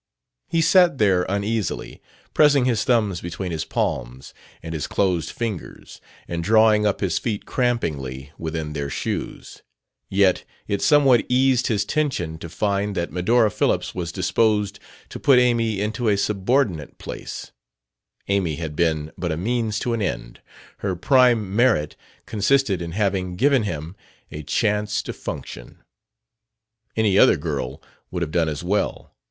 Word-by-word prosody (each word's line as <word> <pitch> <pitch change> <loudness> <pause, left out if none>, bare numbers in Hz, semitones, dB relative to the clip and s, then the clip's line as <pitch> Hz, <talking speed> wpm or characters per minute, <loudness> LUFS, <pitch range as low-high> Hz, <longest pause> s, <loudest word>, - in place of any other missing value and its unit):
He 165 - +1
sat 175 -2 +5
there 95 -5 +2
uneasily, 100 +1 -2 0.3
pressing 145 -4 +5
his 120 -4 +1
thumbs 105 -8 +1
between 90 +1 -5
his 80 -1 -3
palms 60 +3 -3 0.3
and 80 0 -6
his 75 -3 -3
closed 90 -5 0
fingers 110 -7 -6 0.3
and 85 0 -3
drawing 110 +1 +4
up 100 - -1
his 90 -5 0
feet 110 -4 -3
crampingly 70 - -2
within 80 -2 -4
their 70 -1 -3
shoes; - - -5 0.5
yet 95 -1 +3 0.2
it 100 -1 -1
somewhat 140 -5 +5
eased 130 0 +3
his 105 -4 0
tension 100 - -1
to 85 - -8
find 100 +3 -1
that 85 -2 -2
Medora 110 +5 +2
Phillips - - 0
was 85 -3 -4
disposed 105 +3 +1 0.3
to - - -8
put 135 -3 +5
Amy 115 -4 +2
into 110 +3 -1
a 100 - +2
subordinate 100 - 0
place: - - -7 0.8
Amy 95 -6 0
had 80 -1 -5
been 80 -2 0
but 85 -1 -2
a 80 - -2
means 110 +3 -1
to 120 +1 -1
an 115 - -1
end 90 -10 -4 0.4
her 95 -2 -2
prime 115 -1 +3
merit 110 -11 +2 0.3
consisted 110 -3 +1
in 85 -1 -5
having 95 -3 -1
given 135 +4 +3
him 85 -3 -5 0.4
a 75 - -6
chance 105 +6 0
to - - -5
function. - - -8 1.2
Any 105 -3 +3
other - - +6
girl 65 +3 -4 0.3
would 90 -1 -2
have 75 - -4
done 80 -1 +1
as 75 +2 -5
well. 100 +4 -2
100 Hz, 145 wpm, -22 LUFS, 85-115 Hz, 1.2 s, other